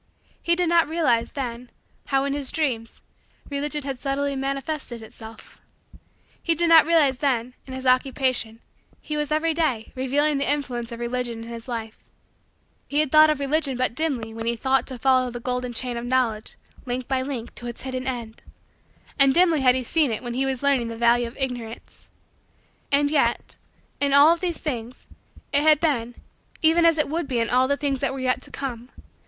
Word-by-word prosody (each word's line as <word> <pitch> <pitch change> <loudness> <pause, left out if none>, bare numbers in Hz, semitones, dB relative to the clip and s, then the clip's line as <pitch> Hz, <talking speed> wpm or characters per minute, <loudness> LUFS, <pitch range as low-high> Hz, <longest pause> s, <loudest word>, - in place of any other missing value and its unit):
He 340 - +2
did 355 0 0
not 335 -1 +4
realize, 270 -8 +1
then, 245 -3 -5 0.4
how, 270 -1 +1
in 280 0 -1
his 280 -2 -2
Dreams, 250 -8 -2 0.5
Religion 290 +1 -2
had 270 -2 -5
subtly 280 +1 -1
manifested 270 -2 -3
itself. 220 0 -13 0.8
He 335 - +1
did 340 +1 +1
not 325 -1 +7
realize, 295 -6 +3
that, 255 -5 +1 0.2
in 260 - -8
his 260 0 -7
Occupation, 255 -3 +1 0.4
he 300 - -5
was, 300 -1 -2
every 315 +1 +1
day, 270 -9 -1
revealing 280 +3 0
the 280 - +1
influence 245 -5 -3
of 235 - -7
Religion 240 -1 -3
in 230 - -10
his 230 +1 -8
life. 225 -3 -5 0.9
He 290 - 0
had 305 -3 +1
seen 310 -1 +6
Religion 280 -1 0
but 255 -2 0
dimly 255 -7 -2
when 225 0 -6
he 235 - +2
had 235 - -9
thought 265 -2 +2
to 260 - -4
follow 255 0 +3
the 240 0 -6
golden 250 0 -2
chain 245 +1 -3
of 235 - -5
Knowledge, 240 -4 0 0.3
link 250 0 -3
by 265 -1 0
link, 260 -4 -5
to 240 - -8
its 240 - -7
hidden 260 0 -4
end. 235 -4 -5 0.8
Dimly 305 +3 +4
had 250 -1 +5
he 260 - -1
seen 300 +3 +2
it 225 +2 -3
when 240 -1 -4
he 265 +2 0
was 265 0 -2
learning 275 -4 +2
the 230 - -5
value 235 +1 +3
of 235 - -12
Ignorance. 245 -4 -5 0.8
And 285 +1 +3
yet, 240 -6 0 0.4
in 280 -1 +1
all 290 +4 +7
of 340 - -5
these 350 -2 -2
things 245 -4 -5 0.5
it 285 - +4
had 305 -1 +5
been 245 -7 0 0.5
even 330 +2 +5
as 330 -1 +5
it 305 - +2
would 320 +1 -2
be 255 -3 -2
in 230 0 0
all 255 +1 +3
the 280 +1 +1
things 275 -2 -1
that 270 -1 -1
were 270 - -5
yet 255 -1 0
to - - -10
come. 245 -3 -6
265 Hz, 195 wpm, -24 LUFS, 240-290 Hz, 0.9 s, not